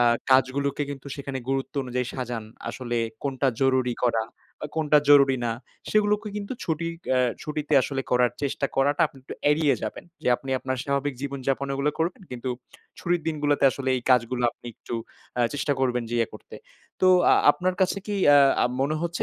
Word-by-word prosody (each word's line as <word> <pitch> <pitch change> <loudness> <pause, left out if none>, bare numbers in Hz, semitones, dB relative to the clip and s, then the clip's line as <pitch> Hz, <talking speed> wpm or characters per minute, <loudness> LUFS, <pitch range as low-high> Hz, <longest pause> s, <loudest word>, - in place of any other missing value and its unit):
আ - - +5 0.3
কাজগুলোকে 135 +2 +2
কিন্তু 140 0 -8
সেখানে 135 -1 -5
গুরুত্ব 135 +1 -2
অনুযায়ী 125 -1 -2
সাজান। 120 -3 -4 0.2
আসলে 120 -2 -4 0.3
কোনটা 135 -1 0
জরুরি 130 -2 +2
করা 115 -2 +2 0.4
বা - - -4
কোনটা 150 -1 +4
জরুরি 140 -2 +6
না? 115 - 0 0.4
সেগুলোকে 210 0 +2
কিন্তু 205 +3 -4
ছুটি 165 0 -2 0.2
অ্যা 130 - +3 0.2
ছুটিতে 150 0 -4
আসলে 135 +1 -2
করার 125 -1 +3
চেষ্টা 140 0 -1
করাটা 140 +2 +2
আপনি 135 - -17
একটু - - -8 0.2
এড়িয়ে 150 -2 +3
যাবেন। 110 - -5 0.2
যে - - 0
আপনি 135 - -8
আপনার 130 0 -3
স্বাভাবিক 140 0 -1
জীবনযাপন 140 0 -2
ওগুলো 140 +2 +1
করবেন 170 +4 -1
কিন্তু 125 +1 -4 0.5
ছুটির 175 -1 0
দিনগুলাতে 145 -2 +1
আসলে 135 0 -4
এই 125 - -4
কাজগুলা 125 0 +2
আপনি - - -16
একটু - - -7 0.4
আ - - +2
চেষ্টা 145 0 0
করবেন 125 -2 +1
যে - - -2
ইয়ে 115 - +1
করতে। - - -12 0.5
তো 185 - +4 0.3
আ - - +7 0.2
আপনার 185 0 -1
কাছে 190 +1 +2
কী 210 - -2 0.5
আ - - +4 0.2
মনে 140 +3 +1
হচ্ছে 170 0 -2
135 Hz, 180 wpm, -25 LUFS, 130-150 Hz, 0.5 s, আ